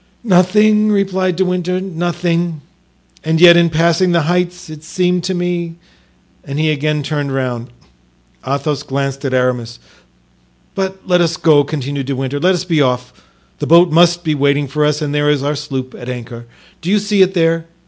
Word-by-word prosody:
"Nothing," 210 +2 +3
replied 190 -2 0
De 190 +2 0
Winter; 180 0 -1
"nothing; 175 -2 -2 0.6
and 160 0 0
yet 175 0 +8
in 170 0 +4
passing 170 +3 +2
the 170 -2 +2
heights 180 +2 -1
it 155 -1 -11
seemed 180 +1 -1
to 190 0 -2
me——" 175 -1 -3 0.7
and 140 +1 -6
he 155 0 +1
again 150 0 -1
turned 145 -1 -3
round. 125 -3 -3 0.8
Athos 140 +2 -2
glanced 135 0 -4
at 130 - -2
Aramis. 125 -2 -1 1.0
"But 190 0 -4
let 180 -1 +3
us 165 -1 0
go," 150 -3 +4
continued 140 -2 -4
De 140 - -2
Winter; 135 +2 -3
"let 180 +4 +2
us 175 - -3
be 165 -4 +1
off; 125 -2 -1 0.5
the - - -3
boat 170 +1 +5
must 175 +1 +3
be 155 -3 0
waiting 140 0 +1
for 150 +3 0
us 150 +1 0
and 145 -1 -3
there 145 0 +1
is 145 -2 +1
our 145 +1 0
sloop 135 -3 -5
at 120 - -9
anchor—do 120 +6 -9
you 210 - +3
see 205 -1 +1
it 190 0 +3
there? 165 -1 +1
160 Hz, 180 wpm, -16 LUFS, 140-180 Hz, 1.0 s, yet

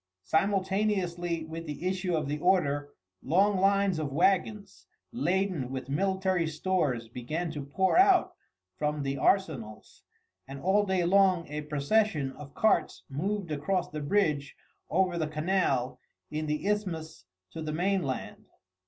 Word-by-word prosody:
Simultaneously 185 - 0
with 165 +1 -7
the 150 +4 -4
issue 185 -2 -1
of 155 -2 -1
the 150 +1 -2
order 145 -5 +2 0.3
long 190 +7 +2
lines 195 -2 +3
of 150 -3 -3
wagons, 195 +6 0 0.2
laden 190 - 0
with 130 0 -5
military 190 +2 +1
stores, 150 -7 -1
began 155 +9 -4
to 150 -3 -5
pour 190 - +2
out 380 -2 +5 0.5
from 150 -1 -1
the 135 0 -1
arsenals, 135 - -1 0.5
and 135 +1 -8
all 200 +5 +2
day 185 -2 +1
long 185 -2 +3
a 150 +1 -4
procession 150 +1 +1
of 140 0 -12
carts 215 -7 +1
moved 190 +4 -2
across 170 +5 -1
the 150 0 -4
bridge 150 -4 0 0.3
over 180 0 +1
the 155 - 0
canal 155 -5 0 0.3
in 155 0 -3
the 150 +3 -2
isthmus 165 - -3 0.3
to 165 - -7
the 155 -1 -3
mainland. 175 -4 -2
170 Hz, 135 wpm, -29 LUFS, 150-190 Hz, 0.5 s, out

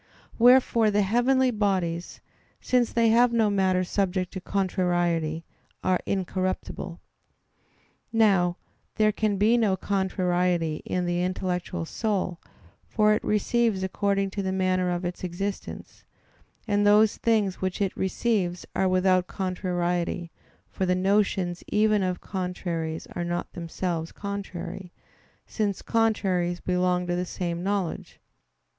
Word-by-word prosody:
Wherefore 240 -2 +5
the 205 0 +2
heavenly 250 +5 +3
bodies, 185 -6 -1 0.4
since 245 -2 +1
they 230 -1 +3
have 235 +2 +5
no 225 -3 +2
matter 190 -2 +2
subject 185 -1 -1
to 190 - -5
contrariety, 175 -4 0 0.4
are 185 -1 +2
incorruptible. 185 -2 -3 1.1
Now 195 -6 +3 0.4
there 215 0 +3
can 210 -1 0
be 220 +4 +4
no 200 -4 +2
contrariety 180 -4 0
in 180 -1 -1
the 175 0 0
intellectual 180 -1 -2
soul; 190 -3 -2 0.5
for 215 -1 +3
it 215 - -1
receives 215 -1 +1
according 195 0 0
to 200 - -3
the 190 -1 -2
manner 185 -1 +1
of 175 0 -2
its 175 +1 -5
existence, 190 +3 -5 0.6
and 205 -1 +2
those 210 +1 +5
things 215 -5 +1
which 185 +1 -2
it 195 -2 -1
receives 190 -2 -1
are 190 - +2
without 185 0 +3
contrariety; 180 -2 -2 0.4
for 190 - -3
the 180 - +2
notions 190 -2 +1
even 215 0 +2
of 185 -1 -1
contraries 175 -4 -4
are 175 - -2
not 175 0 -3
themselves 170 -1 -3
contrary, 190 -2 -6 0.5
since 205 -3 -2
contraries 190 -6 +1
belong 180 0 0
to 175 0 -1
the 180 - -1
same 175 -1 -4
knowledge. 195 -2 -3
185 Hz, 125 wpm, -26 LUFS, 180-205 Hz, 1.1 s, Wherefore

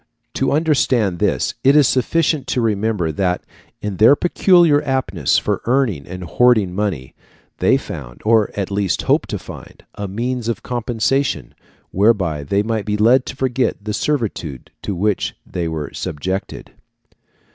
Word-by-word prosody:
To 135 - 0
understand 130 - +1
this - - 0
it 135 +2 +5
is 150 -3 +6
sufficient 145 +1 +1
to - - 0
remember 105 -6 0
that, 90 +3 -1 0.4
in 105 -3 -3
their 115 +7 +7
peculiar 175 -2 +4
aptness 130 - 0
for - - -1
earning 120 - 0
and 90 +1 -7
hoarding 105 - +3
money, 90 -10 -3 0.5
they - - +4
found, - - -8
or 110 -1 +4
at 100 -1 -3
least 100 -2 0
hoped - - +1
to - - -2
find, - - -12
a 100 - -5
means 120 +4 -3
of 115 - -3
compensation 125 +3 -1 0.4
whereby 95 -7 +2
they 100 +8 0
might 110 -1 -2
be 105 0 -1
led 120 +5 +4
to - - -6
forget 130 -5 -1
the 105 - -2
servitude 105 - -3
to 100 - -3
which 100 +2 -1
they 85 -2 -3
were 80 -3 -5
subjected. 95 +7 -4
110 Hz, 150 wpm, -19 LUFS, 95-130 Hz, 0.5 s, their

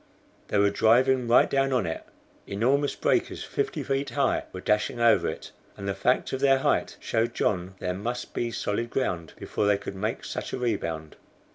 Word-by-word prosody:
They - - 0
were 100 0 +4
driving 125 +4 +3
right 120 - +6
down 135 0 +1
on 125 -6 +1
it. 80 -1 -4 0.4
Enormous 130 +8 +1
breakers - - 0
fifty 420 0 -2
feet 135 0 -1
high 140 -1 +1
were 95 - -7
dashing 105 +5 0
over 115 -1 +4
it, - - -5 0.3
and 100 - -6
the 100 - 0
fact 125 +8 +1
of 130 - -1
their 135 0 +5
height 135 - 0
showed 115 +1 -1
John 95 -1 -1
there 90 -1 -2
must 120 +6 -4
be 120 - -1
solid 115 +1 -2
ground 90 -11 -2
before 105 - -1
they 105 -1 +4
could 100 - -7
make 105 +4 -3
such - - -5
a - - -1
rebound. 85 -10 -3
115 Hz, 185 wpm, -27 LUFS, 100-130 Hz, 0.4 s, right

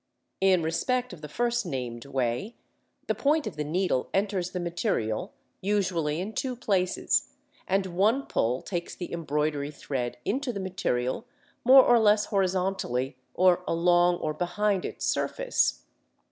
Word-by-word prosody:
In 190 -3 +4
respect 250 +9 -1
of 165 - -11
the 150 - -8
first 240 +6 0
named 125 - -5
way, 130 - -2 0.5
the - - +1
point 300 +1 +1
of 215 - -5
the 150 - -2
needle 155 -3 0
enters 195 -2 0
the 180 -1 -4
material 170 - -1 0.3
usually 180 -6 0
in 200 +5 -4
two 255 +1 -2
places, 195 -6 0 0.3
and 195 +1 +1
one 205 +9 +1
pull 125 +3 0
takes 175 -3 -4
the 175 - -6
embroidery 150 -3 -1
thread 135 -4 -4
into 265 +3 -1
the 200 - -5
material 185 - -2 0.4
more 260 +2 +9
or 240 -1 +5
less 210 -1 +4
horizontally, 185 - 0 0.2
or 180 0 +4
along 175 +1 +3
or 155 -3 -3
behind 185 +4 0
its - - -4
surface - - +1
(Fig. - - -22
180 Hz, 145 wpm, -27 LUFS, 150-210 Hz, 0.5 s, more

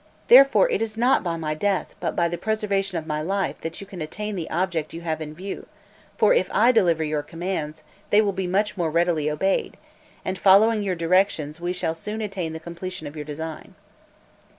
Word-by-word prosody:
Therefore, 275 - +8
it - - 0
is 220 -1 -3
not 245 +3 +3
by 170 -2 -2
my 155 -2 -2
death, 195 +5 -1
but - - -2
by 170 - +2
the 170 - -3
preservation 195 -1 -1
of 160 - -4
my 150 -1 -2
life, 195 +4 -2
that 165 0 -5
you - - -7
can 190 -3 -9
attain 210 +7 -4
the 170 -4 -4
object 170 -3 -2
you 165 - -6
have 160 -2 -3
in 155 0 -6
view; 190 +4 -7 0.5
for - - +5
if - - +2
I 245 - +5
deliver 175 -9 +3
your 150 -1 -1
commands, 165 -2 -5 0.3
they 205 - +5
will 205 -2 +2
be 190 -1 -2
much 205 +4 0
more 170 -4 0
readily 165 -2 +1
obeyed, 190 +6 -1 0.5
and 185 0 -3
following 210 +3 +5
your 195 -3 -1
directions, 165 -3 +1
we 175 +1 -1
shall 180 -3 -1
soon 210 +7 -6
attain 195 -6 -3
the 160 - -6
completion 170 0 -7
of 145 +1 -8
your 150 -1 -6
design." 155 +2 -7
175 Hz, 205 wpm, -24 LUFS, 160-200 Hz, 0.5 s, Therefore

